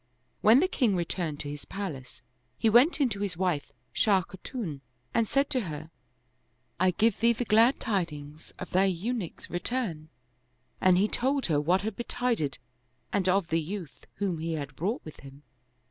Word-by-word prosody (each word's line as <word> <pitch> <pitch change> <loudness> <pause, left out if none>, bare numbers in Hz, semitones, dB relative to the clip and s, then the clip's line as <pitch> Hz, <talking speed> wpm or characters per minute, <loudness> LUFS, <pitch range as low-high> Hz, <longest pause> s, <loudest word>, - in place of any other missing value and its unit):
When 230 +6 +7
the 370 - +3
king 240 - +1
returned 170 -3 -2
to 145 - -5
his 145 0 -6
palace, 140 -12 -7 0.3
he 220 - +2
went 260 +10 +5
in 280 - +4
to 200 -3 -4
his 200 -4 -2
wife 175 -6 -1 0.2
Shah 195 -4 +3
Kha 190 - -12
tun 175 - -5 0.3
and 230 -1 +2
said 275 +4 +2
to 260 - +2
her, 155 +2 -7 0.9
"I 185 +1 +4
give 220 +5 +2
thee 235 +1 +4
the 240 +2 -3
glad 230 +4 +5
tidings 155 - -3
of 185 - -7
thine 190 0 +3
Eunuch's 210 0 -4
return"; 175 -5 -2 0.7
and 185 -1 +5
he 200 +3 +3
told 270 +5 0
her 150 -4 +2
what 180 +5 +2
had 220 -1 -3
be 240 - -4
tided 235 - -1 0.6
and 190 -2 +2
of 185 -2 +2
the 165 0 +2
youth 175 -2 -7
whom 190 -5 -1
he 165 +1 -2
had 140 -3 -5
brought 200 +9 -2
with 155 - -10
him. 140 +1 -13
185 Hz, 180 wpm, -28 LUFS, 160-225 Hz, 0.9 s, When